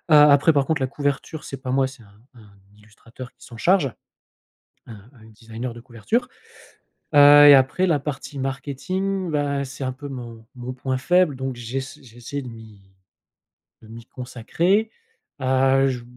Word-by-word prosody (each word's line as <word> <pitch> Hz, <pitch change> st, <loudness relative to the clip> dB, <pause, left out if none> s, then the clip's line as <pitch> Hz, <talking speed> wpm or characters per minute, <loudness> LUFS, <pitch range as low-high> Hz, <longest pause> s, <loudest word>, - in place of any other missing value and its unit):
après 150 Hz, +1 st, +6 dB
par 140 Hz, -2 st, +2 dB
contre 160 Hz, -3 st, -1 dB
la 130 Hz, -, +1 dB
couverture 145 Hz, +2 st, -4 dB
c'est 135 Hz, -, -7 dB
pas 130 Hz, -, -6 dB
moi 135 Hz, +1 st, +2 dB
c'est 130 Hz, -1 st, -10 dB
un 100 Hz, -1 st, -20 dB
un 105 Hz, -4 st, -19 dB, 0.2 s
illustrateur 115 Hz, +4 st, -13 dB
qui -, -, -18 dB
s'en 115 Hz, -, -12 dB
charge, 160 Hz, -, +2 dB, 0.9 s
un 110 Hz, 0 st, -13 dB
un 115 Hz, -4 st, -19 dB
designer 115 Hz, +2 st, -8 dB
de 120 Hz, -, -11 dB
couverture, 130 Hz, -, -3 dB, 0.9 s
heu, 145 Hz, 0 st, +8 dB
et 145 Hz, -, +10 dB
après 135 Hz, +8 st, +3 dB
la 160 Hz, -4 st, +2 dB
partie 140 Hz, 0 st, -6 dB
marketing, 175 Hz, +8 st, -3 dB
bah, 145 Hz, -2 st, -1 dB
c'est 135 Hz, +1 st, -9 dB
un 130 Hz, -, -2 dB
peu 140 Hz, +3 st, -9 dB
mon 120 Hz, -4 st, -9 dB
mon 125 Hz, +1 st, -6 dB
point 130 Hz, 0 st, -3 dB
faible 180 Hz, +2 st, +2 dB
donc 130 Hz, -1 st, -5 dB
j'ess 130 Hz, +5 st, -6 dB
j'ai 120 Hz, -3 st, -17 dB
essayé 140 Hz, +4 st, -6 dB
de 125 Hz, -, -9 dB
m'y 110 Hz, -3 st, -13 dB, 1.0 s
de 110 Hz, -, -16 dB
m'y 115 Hz, +1 st, -12 dB
consacrer, 170 Hz, -, -1 dB, 0.5 s
heu, 130 Hz, +1 st, +3 dB
j 125 Hz, -2 st, -5 dB
130 Hz, 165 wpm, -22 LUFS, 120-145 Hz, 1.0 s, et